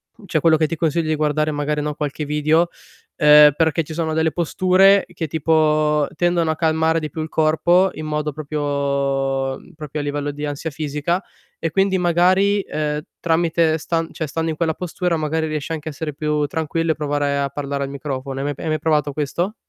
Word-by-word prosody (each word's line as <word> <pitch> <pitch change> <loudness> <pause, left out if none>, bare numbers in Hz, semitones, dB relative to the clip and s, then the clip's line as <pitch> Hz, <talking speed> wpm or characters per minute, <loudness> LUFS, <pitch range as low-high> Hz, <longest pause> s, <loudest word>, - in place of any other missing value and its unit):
mhmm, 220 - -16
cioè 160 - +1
quello 160 +1 +4
che 155 - +2
ti 165 - -3
consiglio, 160 0 0
di 155 - +2
guardare 155 0 0
magari, 150 0 -1
no, 150 0 -2
qualche 150 +1 -4
video, 155 +3 +2 0.5
ehm, 150 -1 +8
perché 160 0 +1
ci 160 - -8
sono 160 -1 -2
delle 160 0 +1
posture 185 +4 +3
che 165 -2 -3
tipo 155 -1 +2
tendono 175 -1 +1
a - - -2
calmare 160 0 +1
di 155 - -4
più 160 - -5
il 155 - -3
corpo 170 +5 +3
in 155 - -6
modo 150 0 -2
proprio 150 +1 -5
proprio 140 -2 -1
mhmm, - - -18
propio 150 -1 -6
a - - -2
livello 145 0 -2
di 145 +1 -5
ansia 145 +2 -4
fisica. 150 +4 -2 0.4
E 165 - -2
quindi 195 +1 +2
magari, 185 +3 +3
ehm, 150 -4 -3 0.2
tramite 165 -1 +2
stan 165 +1 -2
cioè 160 - -3
stando 160 +3 -2
in - - -4
quella 160 0 0
postura 180 0 -2
magari 160 +1 -1
riesci 155 +1 -3
anche 155 0 -5
a - - -5
essere 150 +1 -5
più 150 0 -1
tranquillo, 160 0 -1
e - - -17
provare 145 -1 -1
a 140 0 0
parlare 140 0 -3
al 135 - -4
microfono. 135 -1 -5
Hai 135 - -2
mai 145 - -1
pe - - -11
hai 160 - -2
mai 155 0 0
provato 150 -1 +1
questo? 155 +8 -2
155 Hz, 210 wpm, -20 LUFS, 145-165 Hz, 0.5 s, ehm